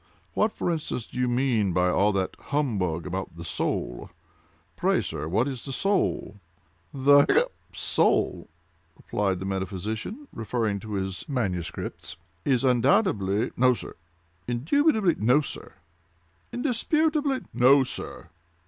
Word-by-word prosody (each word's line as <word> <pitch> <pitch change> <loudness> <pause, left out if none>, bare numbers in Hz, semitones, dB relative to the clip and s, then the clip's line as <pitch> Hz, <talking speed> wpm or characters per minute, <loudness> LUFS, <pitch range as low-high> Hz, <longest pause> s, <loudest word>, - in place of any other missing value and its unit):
What, 215 +1 +2
for 175 - -2
instance, 155 -7 -3
do - - -8
you 125 - +2
mean 120 -6 +1
by 90 0 +3
all 100 +3 +3
that 95 -1 -1
humbug 100 - -1
about 95 -1 -4
the 85 - -7
soul? 75 -2 -2 0.7
Pray, - - +2
sir, 75 - -3
what 110 - +1
is 130 -4 -5
the 135 - -6
soul?" 185 - 0 0.5
"The—hiccup!—soul," 140 +1 +2 0.5
replied 100 -2 -1
the 95 - -5
metaphysician, 100 - -4
referring 110 -2 -1
to 110 +1 -7
his 95 - -3
MS., 95 - -1 0.7
"is 130 +2 +2
undoubtedly—" 120 - +2
"No, 125 0 +4
sir!" - - -7 0.5
"Indubitably—" 185 - +2
"No, 125 +6 +5
sir!" 140 - -6 0.8
"Indisputably—" 290 +2 +1
"No, 135 +3 +6
sir!" 125 - -6
120 Hz, 120 wpm, -26 LUFS, 95-145 Hz, 0.8 s, No